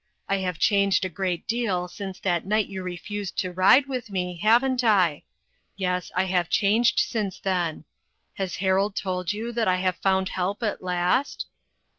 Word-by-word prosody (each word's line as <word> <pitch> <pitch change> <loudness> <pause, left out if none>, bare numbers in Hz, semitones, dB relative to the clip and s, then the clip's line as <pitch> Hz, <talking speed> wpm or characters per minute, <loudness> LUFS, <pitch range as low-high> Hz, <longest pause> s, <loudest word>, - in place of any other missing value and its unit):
I 195 - +1
have 180 -3 -3
changed 200 +1 +3
a - - -2
great 180 0 -3
deal 210 -7 -1
since 190 +1 -7
that 175 -3 0
night 210 +1 +1
you 190 -1 -6
refused 185 +2 -5
to 185 - -1
ride 190 +9 +5
with 255 -4 -5
me, 180 -2 -3
haven't 245 +4 +3
I? 185 -9 +3 0.6
Yes, 180 -2 -2
I 185 - +3
have 180 -3 0
changed 220 +4 +3
since 200 -5 -1
then. 175 -5 -2 0.5
Has 190 -2 -3
Harold 195 +2 +1
told 180 -1 -2
you 220 +3 -4
that 230 -2 0
I 185 - +3
have 185 -1 0
found 190 -1 +1
help 190 +5 -2
at 210 - -2
last 180 +9 0
190 Hz, 170 wpm, -25 LUFS, 180-210 Hz, 0.6 s, ride